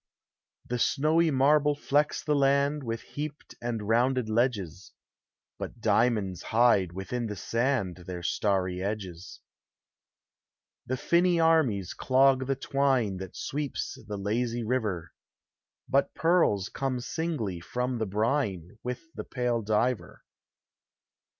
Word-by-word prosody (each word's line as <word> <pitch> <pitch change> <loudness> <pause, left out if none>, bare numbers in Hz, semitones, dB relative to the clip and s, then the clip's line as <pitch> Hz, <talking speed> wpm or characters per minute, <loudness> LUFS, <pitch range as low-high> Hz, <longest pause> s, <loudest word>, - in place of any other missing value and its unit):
The 125 0 -3
snowy 155 +7 +3
marble 145 +1 +3
flecks 145 +1 +1
the 150 - +1
land 140 +1 +2
With 115 -1 -3
heaped 150 0 -7
and 115 -3 -3
rounded 120 +1 +2
ledges, 100 -7 -1 0.7
But - - -6
diamonds 105 -7 +1
hide 110 -6 +3
within 115 +6 -4
the 105 - -5
sand 115 -5 -1
Their 90 -1 -5
starry 95 -1 0
edges. 95 -3 -5 1.5
The 130 - -1
tinny 170 +4 +3
armies 155 - +2
clog 130 0 +3
the 135 - +1
twine 135 -7 +1
That 95 -1 -8
sweeps 145 0 -3
the 105 -1 -4
lazy 115 +4 -1
river, 105 -8 -2 0.7
But 135 +1 +1
pearls 160 - +2
come 135 -2 -2
singly 120 - -3
from 125 +7 -3
the 110 - -1
brine 105 - -1
With 125 +4 -4
the - - -6
pale 125 -2 -1
diver. 110 +3 -1
120 Hz, 120 wpm, -28 LUFS, 100-135 Hz, 1.5 s, snowy